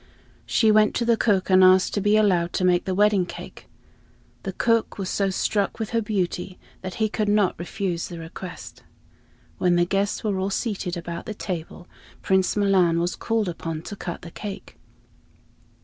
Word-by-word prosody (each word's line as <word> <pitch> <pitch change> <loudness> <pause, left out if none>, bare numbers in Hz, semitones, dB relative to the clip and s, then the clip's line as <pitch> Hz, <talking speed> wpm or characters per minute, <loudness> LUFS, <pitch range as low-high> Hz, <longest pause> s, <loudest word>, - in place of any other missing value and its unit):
She 220 -2 +3
went 215 0 +4
to 235 - 0
the 235 0 +4
cook 200 -4 +1
and 185 0 +7
asked 185 0 +5
to 205 - 0
be 205 +2 +3
allowed 180 -5 +2
to 185 - 0
make 180 -1 +3
the 185 - -1
wedding 205 -2 +3
cake. - - -10 0.7
The - - -4
cook 230 -1 +1
was 190 -2 -3
so 195 -1 +1
struck 200 +1 0
with 220 -2 -4
her 230 -1 +1
beauty 190 -3 -2 0.2
that 185 -1 -6
he 220 -1 +1
could 210 0 -1
not 205 -3 +2
refuse 175 0 -3
the 175 - -8
request. 165 +3 -9 0.8
When 180 -1 +3
the 175 0 +3
guests 195 +2 -1
were 205 -3 -1
all 190 +1 -1
seated 195 -4 -2
about 170 0 -6
the 215 - -5
table, 175 -2 -6 0.4
Prince 190 +1 +2
Milan 185 -5 +3
was 175 +1 -1
called 225 -3 -1
upon 165 -2 -5
to 205 - -7
cut 175 -3 -6
the 170 - -9
cake. 205 +1 -8
190 Hz, 180 wpm, -24 LUFS, 175-210 Hz, 0.8 s, and